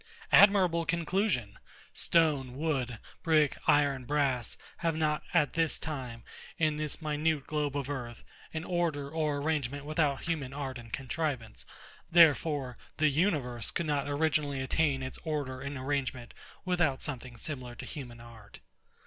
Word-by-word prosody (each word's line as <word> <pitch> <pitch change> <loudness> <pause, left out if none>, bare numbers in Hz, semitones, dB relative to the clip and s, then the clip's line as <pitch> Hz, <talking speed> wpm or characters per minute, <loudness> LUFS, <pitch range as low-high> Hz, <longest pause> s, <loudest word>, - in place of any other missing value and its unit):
Admirable 185 -5 +6
conclusion! 170 - 0 0.3
Stone, 145 -7 +2
wood, 135 -6 -1 0.2
brick, 155 -4 +3
iron, 140 -3 +4
brass, 135 -3 0 0.2
have 165 -1 0
not, 155 -1 +1
at 150 -5 +3
this 165 -1 +2
time, 130 -7 -5 0.3
in 155 -2 +2
this 155 +2 -4
minute 150 -1 0
globe 150 -2 -1
of 140 -2 -3
earth, 120 -5 -5 0.3
an 160 0 -4
order 165 -6 -1
or 155 -2 0
arrangement 145 -2 -1
without 150 -3 0
human 150 -6 -2
art 135 -3 -4
and 115 -1 -12
contrivance; 130 -4 -3 0.4
therefore 150 -6 +4 0.2
the 155 0 +4
universe 140 - 0
could 170 - -2
not 145 -2 0
originally 145 -1 +1
attain 135 0 +1
its 130 - -6
order 145 -5 -3
and 140 0 -4
arrangement, 130 -3 -2 0.3
without 175 -7 +1
something 125 -4 -5
similar 125 -2 -6
to - - -8
human 120 -5 -8
art. 115 -3 -13
145 Hz, 140 wpm, -31 LUFS, 130-160 Hz, 0.4 s, Admirable